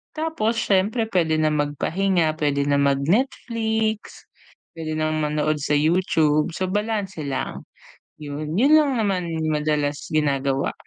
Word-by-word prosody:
tapos 310 -8 -1
siyempre 220 +2 +1
puwede 165 -4 +2
na 155 0 +2
magpahinga, 155 +3 0
puwede 145 -2 +1
na 140 0 +1
mag-Netflix, 220 - 0 0.5
puwede 160 -1 -5
nang 155 0 -1
manood 150 0 0
sa 145 +1 0
YouTube, 155 0 +2
so 185 - -2
balanse 205 -3 -2
lang, 135 -1 -4 0.6
'yun, 150 0 -5
'yun 270 +8 +4
lang 300 -2 +4
naman 195 -6 0 0.2
madalas 150 -1 -1
ginagawa. 140 -3 0
155 Hz, 120 wpm, -23 LUFS, 150-210 Hz, 0.6 s, yun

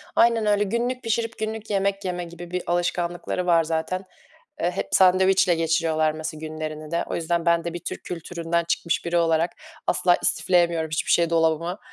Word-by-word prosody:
Aynen 230 -2 +4
öyle. 205 0 +3
Günlük 240 +5 -2
pişirip 230 0 -1
günlük 220 0 -4
yemek 200 -1 0
yeme 180 -1 -2
gibi 175 0 -10
bir 180 0 -2
alışkanlıkları 175 +1 -1
var 165 -2 +4
zaten. 165 +4 -2 0.6
Eee, 175 - +1
hep - - -4
sandviçle 185 0 +4
geçiriyorlar 165 -1 +1
mesela 155 0 -6
günlerini 155 -1 -6
de. 170 - 0
O - - -4
yüzden 170 0 -1
ben 170 0 +3
de 170 - -3
bir - - -3
Türk - - -6
kültüründen 170 0 -2
çıkmış 170 0 0
biri 170 0 -1
olarak 165 0 +2 0.4
asla 175 -1 +3
istifleyemiyorum 170 -3 +2
hiçbir 155 - -1
şey 170 -1 +3
dolabıma. 165 +2 +1
175 Hz, 170 wpm, -24 LUFS, 165-185 Hz, 0.6 s, Aynen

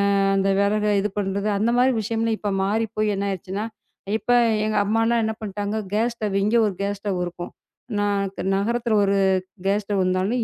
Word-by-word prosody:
ஆ - - +3 0.2
அந்த 195 0 +2
விறகு 210 +1 +2
இது 210 - -1
பண்றது 200 +1 -1
அந்த 220 +4 +1
மாரி 255 +1 +4
விஷயம்லாம் 225 +1 -1
இப்ப 205 - -2
மாறிப்போய் 215 +1 0
என்ன 200 - -2
ஆயிடுச்சுன்னா, 195 +3 -4 0.5
இப்ப 245 - -2 0.3
எங்க 215 - -1
அம்மா 220 +3 +1
எல்லாம் 235 -1 +2
என்ன 220 0 -2
பண்ணிட்டாங்க, 205 0 -3 0.2
கேஸ் 235 +2 +1
ஸ்டவ் 210 -3 -2
இங்க 215 +3 +1
ஒரு 205 - -2
கேஸ் 200 0 -2
ஸ்டவ் 200 -3 -2
இருக்கும். 175 0 -7 0.5
ந - - +1 0.5
நகரத்துல 230 +2 0
ஒரு 200 0 +2 0.5
கேஸ் 205 +1 +1
ஸ்டவ் 200 -1 0
இருந்தாலும் 190 +6 0
210 Hz, 180 wpm, -23 LUFS, 195-225 Hz, 0.5 s, மாரி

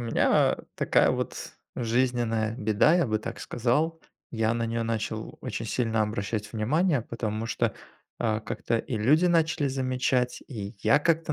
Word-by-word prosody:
меня 115 -1 +3 0.2
такая - - +3
вот - - -4 0.2
жизненная 115 -2 0
беда, 110 +8 +3
я 175 -3 +3
бы 110 -2 0
так - - -6
сказал. 150 +8 0 0.3
Я 110 -1 +1
на 115 0 -1
неё 115 0 -1
начал 115 -1 -3
очень - - -4
сильно 115 -3 0
обращать 105 0 -3
внимание, 140 - +1
потому 110 -1 -4
что, - - 0 0.4
а, 110 -2 0
как-то 115 +1 -2
и 120 - -4
люди 150 +11 +4
начали 160 -3 +2
замечать, 130 -1 0
и 105 -4 -6
я 110 +8 +4
как-то 160 0 +1
115 Hz, 150 wpm, -27 LUFS, 110-135 Hz, 0.4 s, люди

